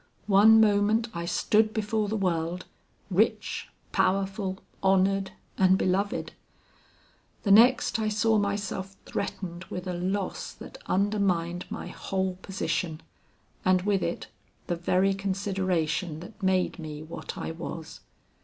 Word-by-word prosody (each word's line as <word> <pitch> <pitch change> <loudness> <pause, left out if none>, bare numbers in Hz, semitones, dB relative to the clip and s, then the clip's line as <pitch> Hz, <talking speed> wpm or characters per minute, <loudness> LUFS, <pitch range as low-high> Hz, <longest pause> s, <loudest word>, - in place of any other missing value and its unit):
One 210 +2 +7
moment 215 +2 +3
I 170 -1 -4
stood 215 +5 +2
before 215 0 0
the 220 - -1
world, 175 -2 -1 0.5
rich, 215 +3 +1 0.2
powerful, 195 0 0 0.2
honored, 195 0 +3 0.3
and 190 0 +5
beloved; 195 +2 0 1.1
the 200 - +2
next, 240 +2 +6
I 220 - 0
saw 215 +1 +2
myself 200 -1 -2
threatened 185 -2 -4
with 180 0 -6
a 180 - -2
loss 185 +2 -2
that - - -11
undermined 185 -3 0
my - - -5
whole 190 -1 -2
position, 175 -4 -2 0.6
and 185 -1 +3
with 200 -2 +1
it 170 - -2 0.4
the 175 - -1
very 185 +3 +2
consideration 185 -5 -1
that 210 +5 -12
made 190 -1 +1
me 155 -1 -6
what 165 +2 -7
I - - -4
was. 165 -1 -7
190 Hz, 125 wpm, -27 LUFS, 180-205 Hz, 1.1 s, One